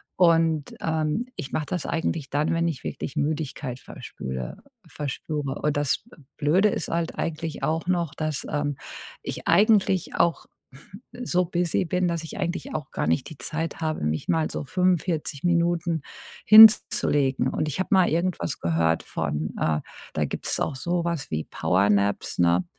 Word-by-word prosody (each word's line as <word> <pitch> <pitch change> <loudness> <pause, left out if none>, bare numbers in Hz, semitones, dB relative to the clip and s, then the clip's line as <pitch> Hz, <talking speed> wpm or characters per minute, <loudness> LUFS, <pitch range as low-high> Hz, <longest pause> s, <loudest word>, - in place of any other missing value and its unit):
Und, 165 -4 +3
ähm, 160 +7 -1
ich 150 -7 -6
mache 150 - -1
das 180 -1 -3
eigentlich 160 -3 -2
dann, 150 +3 0
wenn 165 0 +1
ich 155 -6 -4
wirklich - - -5
Müdigkeit 145 -4 -2
verspüre 65 - -7 0.3
verspüre. 145 -1 -4
Aber 150 - 0
das 145 -1 0
B 240 - -17 0.2
Blöde 170 +8 +3
ist 180 - -3
halt 165 0 -2
eigentlich 160 -1 -4
auch 165 +2 -1
noch, 175 -5 0
dass, 155 -3 -3
ähm, 145 -2 -1 0.5
ich - - -6
eigentlich 200 -4 +3
auch 170 -1 +1 0.7
so 245 -7 0
busy 175 +1 0
bin, 180 +2 0
dass 170 -2 -2
ich 160 - -7
eigentlich 180 -2 -3
auch 150 -3 -4
gar - - -2
nicht 80 +1 0
die 155 - -11
Zeit 160 +6 -3
habe, 155 -1 -2
mich 75 +1 -2
mal 160 -1 +1
so - - -4
45 175 -3 0
Minuten 170 -2 +1 0.4
hinzulegen. 150 - +7
Und 155 +3 -1
ich 150 +5 -3
habe 190 - -1
mal 190 -2 +5
irgendwas 170 -3 -1
gehört 80 0 +1
von, 75 +2 -3
äh 75 -1 +1 0.3
da - - +1
gibt's - - -3
auch 140 - -1
so 170 +5 -1
was 170 -4 -3
wie 80 0 -2
Power 95 +3 +1
Naps, 100 0 0
ne, 85 +1 +3
155 Hz, 165 wpm, -25 LUFS, 135-170 Hz, 0.7 s, hinzulegen